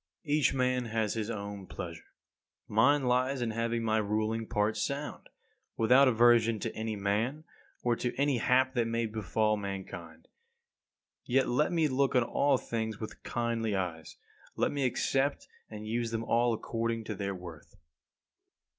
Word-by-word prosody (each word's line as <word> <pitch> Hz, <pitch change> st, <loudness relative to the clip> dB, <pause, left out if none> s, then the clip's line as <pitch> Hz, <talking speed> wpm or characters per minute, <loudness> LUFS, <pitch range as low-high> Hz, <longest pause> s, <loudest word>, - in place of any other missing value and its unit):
43. 145 Hz, -, +1 dB
Each 140 Hz, -2 st, +3 dB
man 125 Hz, -1 st, +1 dB
has 110 Hz, -2 st, -1 dB
his 110 Hz, -1 st, -3 dB
own 100 Hz, -3 st, -5 dB
pleasure. 85 Hz, -2 st, -8 dB, 0.5 s
Mine 135 Hz, +7 st, +4 dB
lies 130 Hz, +2 st, +1 dB
in 120 Hz, -2 st, -1 dB
having 115 Hz, +1 st, -1 dB
my 110 Hz, -1 st, +2 dB
ruling 110 Hz, +2 st, -1 dB
part 105 Hz, +1 st, +1 dB
sound; 140 Hz, +7 st, -4 dB, 0.5 s
without 125 Hz, +5 st, +6 dB
aversion 115 Hz, -1 st, +5 dB
to 110 Hz, +2 st, -4 dB
any 110 Hz, 0 st, -3 dB
man, 110 Hz, +9 st, -1 dB, 0.4 s
or 120 Hz, -1 st, +2 dB
to 120 Hz, +1 st, -2 dB
any 140 Hz, -2 st, +1 dB
hap 130 Hz, +2 st, +3 dB
that 120 Hz, -3 st, +1 dB
may 115 Hz, 0 st, 0 dB
befall 110 Hz, 0 st, 0 dB
mankind. 90 Hz, -5 st, -7 dB, 1.0 s
Yet 130 Hz, +2 st, +2 dB
let 150 Hz, +8 st, +2 dB
me 165 Hz, -3 st, +2 dB
look 135 Hz, 0 st, +1 dB
on 125 Hz, -, +5 dB
all 140 Hz, +3 st, +2 dB
things 110 Hz, -3 st, -3 dB
with 110 Hz, -, -7 dB
kindly 115 Hz, -3 st, -1 dB
eyes. 90 Hz, -4 st, -4 dB, 0.4 s
Let -, -, +1 dB
me 140 Hz, -2 st, -1 dB
accept 135 Hz, +3 st, 0 dB, 0.2 s
and 105 Hz, 0 st, -8 dB
use 115 Hz, +1 st, -1 dB
them 115 Hz, 0 st, -2 dB
all 120 Hz, +1 st, +2 dB
according 115 Hz, 0 st, -2 dB
to 110 Hz, -, -4 dB
their 100 Hz, -1 st, -3 dB
worth. 85 Hz, 0 st, -11 dB
115 Hz, 155 wpm, -30 LUFS, 105-125 Hz, 1.0 s, without